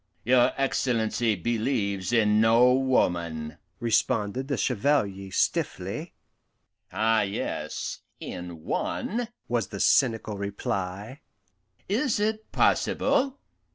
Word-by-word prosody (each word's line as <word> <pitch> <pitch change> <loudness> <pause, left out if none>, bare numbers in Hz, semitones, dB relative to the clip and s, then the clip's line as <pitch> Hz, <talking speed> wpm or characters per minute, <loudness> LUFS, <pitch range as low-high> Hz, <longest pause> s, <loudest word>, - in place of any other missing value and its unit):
"Your 125 +1 +5
Excellency 120 -4 +1
believes 105 -2 -1
in 105 -2 +4
no 115 +3 +5
woman," 85 -12 0 0.2
responded 115 +1 0
the 140 - -1
Chevalier 100 -6 0
stiffly. - - -1 0.8
"Ah 110 0 +2
yes, 100 0 -3 0.2
in 85 -2 -7
one!" 235 +3 -2 0.2
was 120 -5 0
the 100 - -7
cynical 115 -6 +2
reply. 100 - -4 0.7
"Is 225 +3 +1
it 215 +1 -2
possible? 270 0 +2
115 Hz, 90 wpm, -26 LUFS, 100-130 Hz, 0.8 s, Your